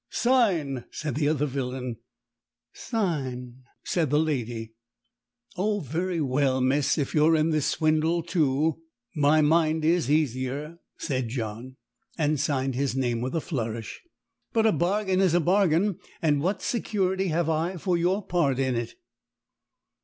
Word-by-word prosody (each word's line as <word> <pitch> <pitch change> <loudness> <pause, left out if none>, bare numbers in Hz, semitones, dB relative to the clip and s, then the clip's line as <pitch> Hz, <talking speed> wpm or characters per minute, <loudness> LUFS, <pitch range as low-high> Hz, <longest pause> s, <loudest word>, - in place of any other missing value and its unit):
"Sign!" 185 - +1
said 155 -1 -4
the 145 0 0
other 150 -1 +1
villain. 130 -3 -4 0.8
"Sign!" 130 - -3 0.2
said 165 -5 0
the 150 - +2
lady. 120 -7 -2 0.8
"Oh, 205 +3 0
very 170 +4 -2
well, 135 -2 +1
miss. 135 +2 +2
If 145 -3 -2
you're 155 +1 +4
in 155 +1 +2
the 155 -1 +1
swindle 155 +3 +1
too, 155 -2 +1 0.3
my 150 +1 +4
mind 160 0 +2
is 165 -4 +2
easier," 145 +2 -1 0.2
said 130 -5 -2
John, 115 +1 -5 0.4
and 150 -2 +1
signed 135 -1 0
his 135 0 -1
name 120 -3 0
with 130 +6 -3
a 165 - 0
flourish. 115 -7 -4 0.5
"But 225 -1 +3
a 220 - +5
bargain 190 +1 +1
is 180 -3 +3
a - - +5
bargain, 185 +1 +2 0.2
and 145 -3 +2
what 190 +4 -1
security 195 -5 0
have 165 0 0
I 165 +3 -1
for 180 +2 0
your 180 +4 0
part 150 -7 +1
in 130 -1 +1
it?" 115 -1 -3
155 Hz, 145 wpm, -26 LUFS, 130-175 Hz, 0.8 s, a